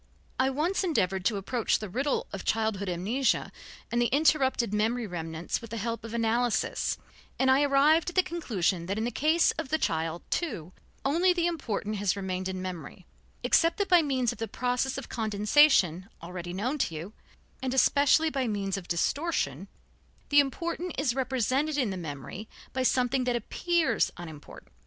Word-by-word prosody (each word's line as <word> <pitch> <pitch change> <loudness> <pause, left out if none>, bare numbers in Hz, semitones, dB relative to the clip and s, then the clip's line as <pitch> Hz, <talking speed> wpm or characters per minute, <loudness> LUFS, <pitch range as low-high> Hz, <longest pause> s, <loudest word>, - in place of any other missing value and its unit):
I 260 +1 +3
once 315 +9 0
endeavored 190 - 0
to 215 -2 +2
approach 225 +4 0
the 215 - -6
riddle 265 +9 -1
of 195 - -5
childhood 220 -3 0
amnesia 215 +10 0 0.4
and 240 +1 +1
the 240 - +3
interrupted 265 -6 +2
memory 225 +3 0
remnants 165 -1 -4
with 230 - -10
the 230 - -5
help 230 +1 -3
of 230 0 -6
analysis, 235 +1 0 0.4
and 265 0 +3
I 265 +2 +5
arrived 290 +4 +4
at 350 - -11
the 370 - +5
conclusion 195 - -1
that 195 +2 -2
in 220 - -1
the 240 - -1
case 310 +8 +3
of 320 - -4
the 315 - +2
child, 165 - -1
too, 215 - -2 0.3
only 345 +6 +3
the 345 -1 0
important 225 -11 -2
has 200 -2 +1
remained 185 -1 -3
in 190 - -4
the 185 - -5
memory, 180 -3 -7 0.4
except 330 0 +3
that 405 -1 -1
by 355 -2 +7
means 260 -5 0
of 240 - -10
the 225 - -2
process 250 +4 -1
of 275 - -6
condensation 210 - +3
already 175 0 -6
known 240 +11 -2
to 165 - -1
you, 170 +7 -7 0.5
and 260 -1 -2
especially 285 +4 +4
by 270 -3 -1
means 200 -2 -2
of 185 - -8
distortion, 285 - -1 0.6
the 290 - +6
important 340 +5 -1
is 275 -4 +1
represented 265 +3 0
in 250 -8 +1
the - - -3
memory 165 - -7 0.2
by 260 - -1
something 255 0 +2
that 245 -1 +1
appears 340 +7 +1
unimportant. 160 -4 -11
240 Hz, 175 wpm, -28 LUFS, 195-285 Hz, 0.6 s, by